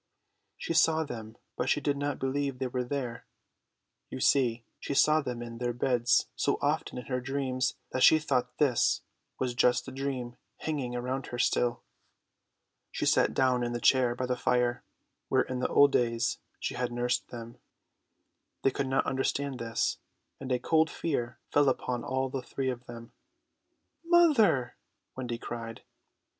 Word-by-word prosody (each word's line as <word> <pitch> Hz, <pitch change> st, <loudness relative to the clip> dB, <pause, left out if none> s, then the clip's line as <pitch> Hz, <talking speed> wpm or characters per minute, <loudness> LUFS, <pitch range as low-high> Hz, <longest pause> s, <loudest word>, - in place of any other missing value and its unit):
She -, -, -3 dB
saw 160 Hz, 0 st, +4 dB
them, 110 Hz, -6 st, -8 dB, 0.2 s
but 125 Hz, -, -1 dB
she -, -, +3 dB
did 145 Hz, -1 st, 0 dB
not 145 Hz, 0 st, -2 dB
believe 135 Hz, 0 st, -1 dB
they 130 Hz, -, -2 dB
were 125 Hz, 0 st, -2 dB
there. 125 Hz, -2 st, -4 dB, 0.8 s
You -, -, -6 dB
see, 120 Hz, -3 st, +2 dB
she 140 Hz, -, -4 dB
saw 155 Hz, +2 st, +5 dB
them 125 Hz, -4 st, -4 dB
in 115 Hz, -1 st, -8 dB
their 120 Hz, -1 st, -1 dB
beds 120 Hz, 0 st, +2 dB
so -, -, +1 dB
often -, -, -1 dB
in 125 Hz, -, -6 dB
her 125 Hz, -1 st, -2 dB
dreams 130 Hz, -1 st, -1 dB, 0.2 s
that 130 Hz, -, -2 dB
she 160 Hz, -, +8 dB
thought 140 Hz, -5 st, -1 dB
this 135 Hz, -5 st, +2 dB, 0.4 s
was 125 Hz, -2 st, -1 dB
just 120 Hz, 0 st, +3 dB
the -, -, -7 dB
dream 130 Hz, -3 st, -4 dB, 0.2 s
hanging 140 Hz, -6 st, -3 dB
around 125 Hz, +2 st, -3 dB
her 120 Hz, -, -5 dB
still. 120 Hz, 0 st, +1 dB, 1.1 s
She -, -, -2 dB
sat -, -, +3 dB
down 130 Hz, -2 st, +3 dB
in 120 Hz, 0 st, -2 dB
the 120 Hz, -, -2 dB
chair 125 Hz, -1 st, +3 dB
by 125 Hz, -, -2 dB
the 125 Hz, 0 st, 0 dB
fire, 125 Hz, 0 st, +1 dB, 0.5 s
where -, -, +3 dB
in 130 Hz, -1 st, -4 dB
the -, -, +1 dB
old 145 Hz, 0 st, +5 dB
days 115 Hz, -2 st, +1 dB, 0.2 s
she -, -, -3 dB
had 125 Hz, 0 st, -2 dB
nursed 120 Hz, +1 st, -1 dB
them. 115 Hz, -1 st, -9 dB, 1.0 s
They 135 Hz, -, +4 dB
could 135 Hz, +1 st, -2 dB
not 135 Hz, 0 st, +1 dB
understand 135 Hz, 0 st, -1 dB
this, 115 Hz, 0 st, -1 dB, 0.4 s
and 135 Hz, -1 st, -6 dB
a 125 Hz, -, +3 dB
cold 160 Hz, +4 st, +2 dB
fear 125 Hz, -9 st, -3 dB
fell 145 Hz, -1 st, +4 dB
upon 125 Hz, -1 st, -2 dB
all 130 Hz, +1 st, -1 dB
the 130 Hz, 0 st, -4 dB
three 130 Hz, +1 st, -2 dB
of 125 Hz, 0 st, -9 dB
them. 115 Hz, 0 st, -10 dB, 0.9 s
"Mother!" 290 Hz, -, +4 dB, 0.4 s
Wendy 125 Hz, -2 st, -4 dB
cried. 115 Hz, -1 st, -7 dB
125 Hz, 165 wpm, -29 LUFS, 120-135 Hz, 1.1 s, she